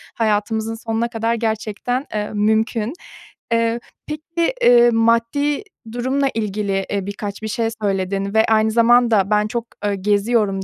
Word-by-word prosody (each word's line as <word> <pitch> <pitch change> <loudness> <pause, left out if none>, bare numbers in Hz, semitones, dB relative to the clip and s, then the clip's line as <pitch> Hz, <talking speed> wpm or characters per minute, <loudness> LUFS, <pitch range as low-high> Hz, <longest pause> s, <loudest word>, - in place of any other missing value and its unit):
hayatımızın 220 0 0
sonuna 225 0 -2
kadar 230 0 -1
gerçekten, 225 +3 -2
eee, 210 -1 -2
mümkün. 220 +3 +1 0.6
Eee, 230 0 +1 0.3
peki, 330 +6 -2
eee, 240 - +6
maddi 230 - +1 0.3
durumla 260 +3 0
ilgili, 200 -3 -1
eee, 200 -2 -1
birkaç 200 0 -6
bir - - -2
şey 230 0 -1
söyledin 195 0 -1
ve 220 0 +4
aynı 220 0 +2
zamanda, 230 -3 +4
"Ben 210 0 +3
çok, 235 +1 -3 0.2
eee, 205 -1 +1
geziyorum" 205 0 +1
225 Hz, 135 wpm, -20 LUFS, 205-235 Hz, 0.6 s, eee